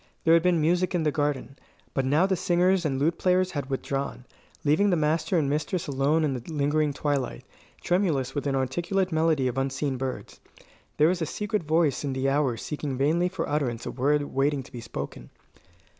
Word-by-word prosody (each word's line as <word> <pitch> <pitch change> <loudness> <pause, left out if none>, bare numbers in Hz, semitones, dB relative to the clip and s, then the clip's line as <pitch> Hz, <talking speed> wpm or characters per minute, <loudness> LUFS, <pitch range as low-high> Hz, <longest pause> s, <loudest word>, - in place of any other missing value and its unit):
There 165 - +5
had 165 - +6
been 180 -1 +2
music 175 +4 +1
in 170 - +1
the 150 - +2
garden; 140 -3 -2 0.3
but 135 - 0
now 150 +7 +3
the 190 -1 +1
singers 180 +1 +2
and 135 -3 0
lute 155 +5 0
players 185 0 +2
had 145 -2 -4
withdrawn, 135 -1 -3 0.4
leaving 155 +8 +3
the 180 - +3
master 160 +2 +1
and 150 -4 +2
mistress 155 +5 -1
alone 145 +3 +1
in 145 -3 +1
the 125 - -4
lingering 150 0 +1
twilight, 140 - -2 0.4
tremulous 160 -8 +1
with 145 0 -2
inarticulate 170 +8 0
melody 160 -4 +2
of 125 +1 -1
unseen 135 0 -1
birds. 130 0 -5 0.6
There 150 - +5
was 180 -1 -1
a 160 - 0
secret 210 +4 -2
voice 155 -3 +1
in 140 -2 -2
the 130 +1 0
hour 135 -4 +1
seeking 145 0 -4
vainly 165 +6 +2
for 180 -3 -3
utterance 130 -6 -1
a - - -3
word 145 +3 +1
waiting 140 0 0
to 125 - -16
be 120 -3 -7
spoken. 70 -11 -7
150 Hz, 190 wpm, -26 LUFS, 135-170 Hz, 0.6 s, had